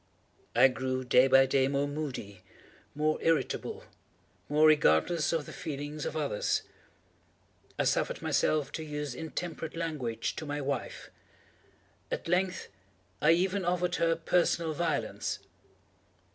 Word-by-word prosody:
I - - +8
grew, 130 0 -2
day 125 +1 +5
by 135 0 +6
day, 135 0 +2
more 140 +1 0
moody, 135 -10 -5 0.5
more 155 +1 +1
irritable, 165 -1 0 0.7
more 150 +1 +4
regardless 150 - +4
of 165 -3 -1
the - - -9
feelings 150 -2 -5
of 155 - -4
others. 140 -9 0 1.1
I - - +1
suffered - - 0
myself 150 -2 +1
to 160 - -5
use 150 -3 -4
intemperate 160 +2 -5
language 135 -9 -3
to 160 - -5
my 145 0 -3
wife. 140 -2 -4 1.0
At - - -4
length, 180 +2 0 0.5
I 155 +2 +6
even 185 +3 +1
offered 180 0 0
her 165 0 +2
personal 165 -1 +1
violence. 160 -2 -2
150 Hz, 125 wpm, -30 LUFS, 135-165 Hz, 1.1 s, I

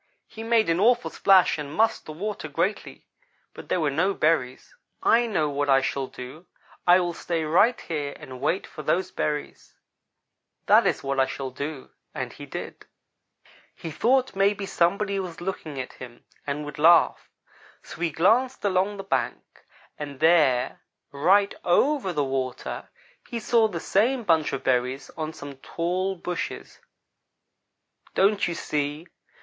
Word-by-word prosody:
He 220 - -10
made 225 -1 +2
an 165 +1 +1
awful 240 +4 +3
splash 190 -5 +4
and 145 -1 -5
mussed 220 +8 +1
the - - -6
water 195 +1 -5
greatly; 170 +8 -3 0.5
but - - -11
there - - +1
were 150 -3 +1
no 185 +7 +1
berries. 150 - 0 0.3
"'I 235 +1 +4
know 160 -9 0
what 145 0 -1
I 135 0 +5
shall 135 0 -2
do. 130 +9 -10 0.4
I 175 +1 +7
will 175 -1 -1
stay 165 -1 -2
right 200 +10 +3
here 145 -4 -4
and 130 -1 -10
wait 180 +6 0
for 155 - -9
those 185 +5 0
berries; 150 -4 -4 0.9
that - - +5
is - - -1
what 135 0 -1
I 130 - +4
shall 135 -1 -5
do'; 140 +1 -6 0.2
and - - -4
he - - -10
did. - - -8 0.9
"He 165 - -7
thought 255 - +1
maybe 200 +1 +1
somebody 195 +3 +1
was 180 -3 -6
looking 170 -6 -5
at 130 - -6
him 120 -2 -12 0.2
and 150 +1 -3
would 145 -1 -8
laugh, 170 +2 +4 0.5
so - - -11
he 170 - +1
glanced 225 - +2
along 195 +1 +1
the 195 - -6
bank. 195 - -3 0.4
And 145 -2 -7
there, 150 -6 +3 0.3
right 190 +8 +3
over 255 +4 +2
the 150 -4 0
water, 130 -2 -4 0.4
he 235 -3 -3
saw 225 0 +3
the 175 -6 -5
same 235 +9 +1
bunch 160 -6 +2
of 135 - -4
berries 130 +1 0
on 155 -1 -4
some 145 -3 -10
tall 180 +6 -2
bushes. 180 0 -5 1.4
Don't 200 +1 +3
you 170 - -3
see? 150 +1 -3
170 Hz, 155 wpm, -25 LUFS, 145-195 Hz, 1.4 s, I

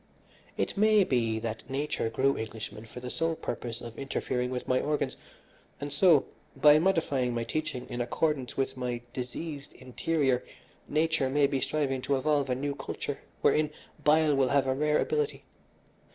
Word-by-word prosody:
It - - -1
may 215 0 +5
be 115 -8 +1
that 110 0 -4
nature 135 -4 -1
grew 135 +4 +2
Englishmen 110 0 -6
for 125 - -9
the 125 0 -5
sole 165 0 0
purpose 120 -5 -5
of 115 -1 -8
interfering 125 -2 -2
with 125 -1 -4
my 130 0 +3
organs, 150 0 -1 0.6
and 145 0 -4
so, 155 -1 +5 0.3
by 150 0 +7
modifying 150 -9 +1
my 115 - 0
teaching 155 -1 -3
in 120 - -3
accordance 135 +1 -1
with 135 - 0
my 125 -2 -3
diseased 140 +3 -5
interior, 135 -1 0 0.4
nature 155 -3 +1
may 145 +1 +3
be 135 -1 0
striving 140 -2 0
to 140 - +1
evolve 145 0 +1
a 125 - +2
new 140 +2 -2
culture - - -5 0.2
wherein 150 0 +3 0.3
bile 155 0 +5
will 135 -2 +3
have 140 0 +3
a 130 - +2
rare 150 +2 +2
ability. 450 -1 -1
140 Hz, 165 wpm, -29 LUFS, 125-150 Hz, 0.6 s, by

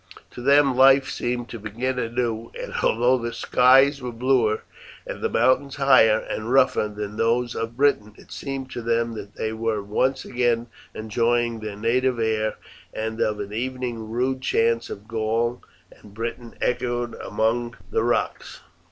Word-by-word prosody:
To - - -9
them 140 0 +4
life 135 +1 +5
seemed 120 0 -3
to 115 - -7
begin 120 +5 -3
anew, 115 -1 -2
and - - -6
although 120 +3 +3
the 120 0 -3
skies 135 +3 +4
were 125 -1 -4
bluer 120 -2 +1 0.4
and - - -7
the - - 0
mountains 135 +1 +2
higher 130 -6 +5
and 110 +2 -5
rougher 130 -5 +3
than 105 0 -6
those 120 +1 +1
of 115 +1 -5
Britain, 110 -7 +1
it - - -17
seemed 135 -1 -5
to 120 - -5
them 115 0 0
that 105 -2 -9
they 110 0 -3
were 110 -2 -2
once 130 +6 0
again 120 -2 0 0.3
enjoying 115 +1 0
their 105 -2 -6
native 125 +3 +1
air, 110 -1 0 0.4
and 110 +1 -4
of 105 -1 0
an 100 0 -6
evening 120 -2 -4
rude 130 +3 -1
chants 115 -2 +1
of 100 +2 -8
Gaul 115 +2 -1 0.3
and 105 -1 -17
Britain 115 +1 -5
echoed 120 -1 -1
among 115 +2 -1 0.2
the - - +1
rocks. 120 +1 -2
115 Hz, 160 wpm, -24 LUFS, 110-125 Hz, 0.4 s, life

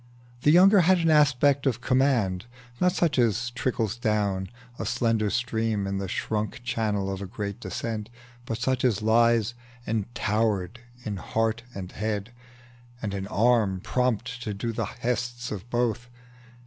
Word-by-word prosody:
The 145 - +3
younger 190 +5 +7
had 185 +2 +5
an 165 -2 +2
aspect 145 -2 +4
of 120 -3 +1
command, 125 -7 +1 0.3
Not 180 0 +4
such 165 -7 +1
as 120 +1 +1
trickles 120 -3 -1
down, 105 -5 0 0.3
a - - -2
slender 115 -3 +1
stream, 110 -3 -1
In 95 0 -2
the 100 - -3
shrunk 105 +3 -3
channel 105 -5 -1
of 95 - -6
a 100 - -5
great 100 0 -5
descent, 110 -3 -4 0.4
But 115 - -2
such 130 +2 0
as 110 -4 +1
lies 115 0 +3 0.3
entowered 110 -1 -1 0.3
in 105 -2 -3
heart 115 +4 -1
and 95 -2 -6
head, 105 0 -3 0.7
And 105 -4 -4
an 95 -1 -4
arm 110 -3 +2
prompt 120 +2 -1
to 105 -3 -4
do 115 +3 -3
the - - -1
'hests 125 0 -3
of 105 +2 -6
both. 120 0 -1
115 Hz, 150 wpm, -26 LUFS, 105-125 Hz, 0.7 s, younger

